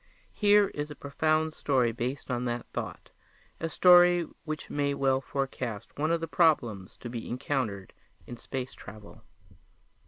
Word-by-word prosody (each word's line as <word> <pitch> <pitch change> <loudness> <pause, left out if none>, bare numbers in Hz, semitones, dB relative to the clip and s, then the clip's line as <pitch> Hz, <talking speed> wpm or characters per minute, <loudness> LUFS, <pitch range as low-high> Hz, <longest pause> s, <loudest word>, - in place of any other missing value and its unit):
Here 205 -1 +4
is 145 +1 -5
a 150 - -8
profound 155 +2 0
story 130 -6 +1
based 125 +4 -4
on 125 0 -1
that 120 0 -2
thought - - -6 0.5
a 165 - -2
story 175 +1 +6 0.2
which 155 -1 -5
may 140 -1 -1
well 135 -1 +2
forecast 130 -6 -4
one 155 +2 0
of 165 0 +1
the 165 - -3
problems 145 - +1
to - - -6
be 115 -1 -6
encountered 120 -7 -3 0.3
in 120 - -8
space 130 +2 -6
travel. 105 +2 -12
140 Hz, 150 wpm, -29 LUFS, 120-155 Hz, 0.5 s, story